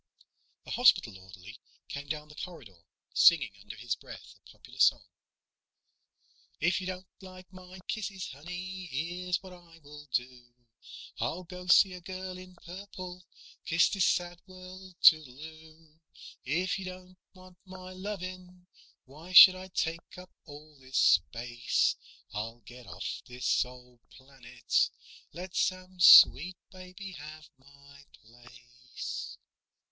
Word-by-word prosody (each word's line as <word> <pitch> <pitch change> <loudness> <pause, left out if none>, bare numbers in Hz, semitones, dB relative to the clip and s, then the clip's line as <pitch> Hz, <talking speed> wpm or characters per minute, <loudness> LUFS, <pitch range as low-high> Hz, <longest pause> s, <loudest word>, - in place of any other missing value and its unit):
A - - -9
hospital 115 - +3
orderly 95 +5 -13 0.3
came 145 0 -7
down 150 0 -5
the 150 - -15
corridor, 150 - -10 0.3
singing 155 -9 +5
under 105 +2 -10
his 115 0 -3
breath - - -13
a - - -22
popular - - -16
song: - - +4 1.5
If 175 +3 +1
you 185 - -6
don't 185 0 -6 0.2
like 185 0 -13
my 185 0 -12
kisses, 195 -4 -4
honey, 180 +6 -8
Here's 175 +6 -3
what 185 -1 -11
I 175 -2 -17
will 150 -1 -14
do: 125 -1 -4 0.6
I'll 180 +2 -3
go 180 +1 -10
see 185 +1 +6
a 180 - -9
girl 185 0 -7
in 185 0 -13
purple, 180 0 -10 0.4
Kiss 165 +1 +3
this 195 -4 +1
sad 175 -1 -1
world 185 0 -12
toodle 145 -5 +5
oo. 160 0 -14 0.5
If 175 +8 -1
you 190 - -7
don't 185 0 -11 0.2
want 185 -1 -17
my 185 0 -11
lovin', 185 -2 -8 0.4
Why 155 +7 -13
should 185 0 +11
I 185 0 -9
take 170 -1 -4
up 180 0 -12
all 150 -1 -14
this 130 0 -6
space? 120 +7 +2 0.4
I'll 115 +3 -5
get 120 +3 -14
off - - -6
this 125 0 0
old 125 -1 -15
planet, 130 -3 -2 0.4
Let 180 +3 -9
some 185 0 -2
sweet 175 0 +8
baby 185 +1 -10
have 155 -1 -11
my 140 +1 -19
place. 120 +1 -10
170 Hz, 130 wpm, -29 LUFS, 130-185 Hz, 1.5 s, should